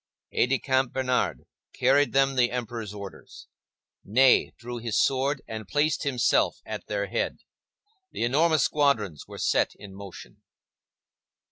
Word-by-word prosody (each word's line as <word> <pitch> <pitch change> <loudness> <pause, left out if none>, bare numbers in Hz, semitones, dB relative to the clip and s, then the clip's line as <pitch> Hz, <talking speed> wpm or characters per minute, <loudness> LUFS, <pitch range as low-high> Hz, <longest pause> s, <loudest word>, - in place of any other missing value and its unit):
Aide - - +2
de 135 - +2
camp 130 -2 0
Bernard 130 -1 0 0.3
carried 140 +3 +3
them 135 0 +3
the 120 -2 +3
Emperor's 115 -4 -5
orders. 100 -6 -10 0.6
Ney 130 +5 +4
drew 120 0 -7
his 115 -2 -1
sword 135 +1 +1
and 110 -2 -7
placed 150 +3 +1
himself 130 -4 +1
at - - -6
their 100 -1 -1
head. 115 +4 -2 0.7
The - - -3
enormous 150 +4 +3
squadrons 110 - 0
were - - -10
set - - +1
in 100 -2 -12
motion. 95 -11 -11
125 Hz, 135 wpm, -26 LUFS, 105-135 Hz, 0.7 s, Ney